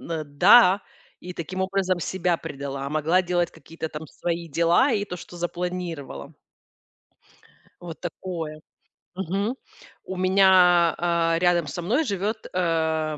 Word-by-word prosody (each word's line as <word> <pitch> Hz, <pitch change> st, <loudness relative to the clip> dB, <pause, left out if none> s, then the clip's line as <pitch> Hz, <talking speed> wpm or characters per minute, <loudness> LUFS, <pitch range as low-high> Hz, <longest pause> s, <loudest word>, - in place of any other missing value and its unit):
н -, -, -11 dB
э, 160 Hz, -2 st, -2 dB
"да" 185 Hz, +7 st, +6 dB, 0.4 s
и, 180 Hz, -, -8 dB
таким 180 Hz, +2 st, -5 dB
образом, 190 Hz, -1 st, 0 dB
себя 180 Hz, -1 st, 0 dB
предала, 140 Hz, -4 st, -6 dB
а -, -, -3 dB
могла 155 Hz, +5 st, +2 dB
делать 175 Hz, -1 st, 0 dB
какие-то 160 Hz, 0 st, -8 dB
там 155 Hz, +1 st, -8 dB
свои 170 Hz, +2 st, -4 dB
дела 170 Hz, -, +3 dB
и 205 Hz, -2 st, 0 dB
то, 180 Hz, -3 st, -6 dB
что 175 Hz, -, -11 dB
запланировала. 175 Hz, -, -5 dB, 1.5 s
Вот 170 Hz, -2 st, -9 dB
такое. 165 Hz, -3 st, -6 dB, 0.6 s
Мгм. 195 Hz, +6 st, -2 dB, 0.5 s
У 190 Hz, -, -6 dB
меня, 185 Hz, -2 st, +5 dB
э, 170 Hz, -1 st, +1 dB
рядом 175 Hz, -2 st, +2 dB
со 145 Hz, +5 st, -5 dB
мной 235 Hz, -, +1 dB
живёт, 215 Hz, -, -3 dB
э, 160 Hz, -3 st, 0 dB
175 Hz, 135 wpm, -24 LUFS, 165-185 Hz, 1.5 s, да